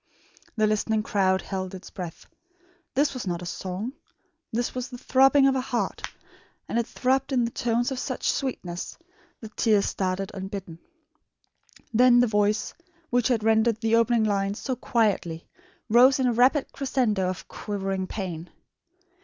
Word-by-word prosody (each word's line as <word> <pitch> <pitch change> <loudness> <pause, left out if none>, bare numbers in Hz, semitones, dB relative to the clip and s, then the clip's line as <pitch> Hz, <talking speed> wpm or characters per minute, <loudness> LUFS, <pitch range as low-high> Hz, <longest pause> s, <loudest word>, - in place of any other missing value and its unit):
The 215 -1 +2
listening 215 0 +1
crowd 190 -3 +1
held 190 -1 -4
its 185 - -11
breath. 175 -4 -7 0.7
This 285 +2 +2
was 250 -6 -5
not 175 0 -2
a - - -6
song. 190 +7 -4 0.6
This 235 +2 -1
was 255 0 -4
the 250 - -8
throbbing 270 +2 +4
of 270 -1 +4
a 260 - +1
heart; 250 -2 -2 0.7
and 235 - 0
it 235 - -1
throbbed 265 +2 0
in 250 -3 +2
tones 240 +2 0
of 260 - -3
such 255 -1 -1
sweetness, 180 -10 -4 0.4
that 220 -2 -10
tears 210 -3 +3
started 190 0 -2
unbidden. 190 -3 -6 1.1
Then 245 +1 +6
the 245 - +5
voice, 210 -1 +1 0.4
which 245 -1 +2
had 235 -4 +1
rendered 220 0 +3
the 225 0 +2
opening 230 0 +3
lines 200 -1 0
so 260 +1 -3
quietly, 205 -10 0 0.4
rose 250 +5 +6
in 260 - +1
a 245 - +2
rapid 260 +5 +3
crescendo 235 -9 0
of 185 - -6
quivering 195 -2 -3
pain. 180 -5 -5
220 Hz, 155 wpm, -26 LUFS, 195-250 Hz, 1.1 s, Then